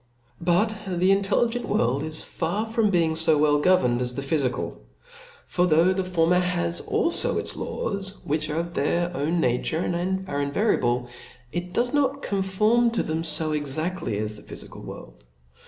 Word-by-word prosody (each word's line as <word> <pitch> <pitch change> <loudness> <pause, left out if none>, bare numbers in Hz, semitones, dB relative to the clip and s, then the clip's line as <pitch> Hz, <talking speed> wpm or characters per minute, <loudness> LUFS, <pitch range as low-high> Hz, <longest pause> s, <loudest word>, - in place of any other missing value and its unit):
But 180 +6 +2
the 185 +1 +2
intelligent 220 +5 +1
world 125 +4 +1
is 155 0 -4
far 205 +7 -2
from 225 -1 +1
being 170 -4 +2
fo 160 -1 +3
Well 145 0 +3
governed 145 -8 +3
as 125 0 0
thephyfical. 135 -2 -1 0.7
For 180 0 +1
though 165 +3 +4
the 190 0 -1
for 180 -3 +1
mer 180 +2 +4
has 85 - 0
alfo - - 0
its - - -3
laws, 195 0 -3
which 155 +1 -1
of 170 +3 -2
their 175 +4 0
own 165 +4 0
nature 125 +4 0 0.5
are 145 -3 -2
invariable, 140 - +1 0.4
it 175 +1 -4
does 245 +6 +1
not 280 -1 +1
conform 210 +5 +2
to 235 - 0
them 160 +1 -2
fo 155 -1 0
exaftly 150 - -2
as 105 0 -3
the - - -11
phyfical - - -10
world. - - -10
170 Hz, 155 wpm, -25 LUFS, 145-190 Hz, 0.7 s, though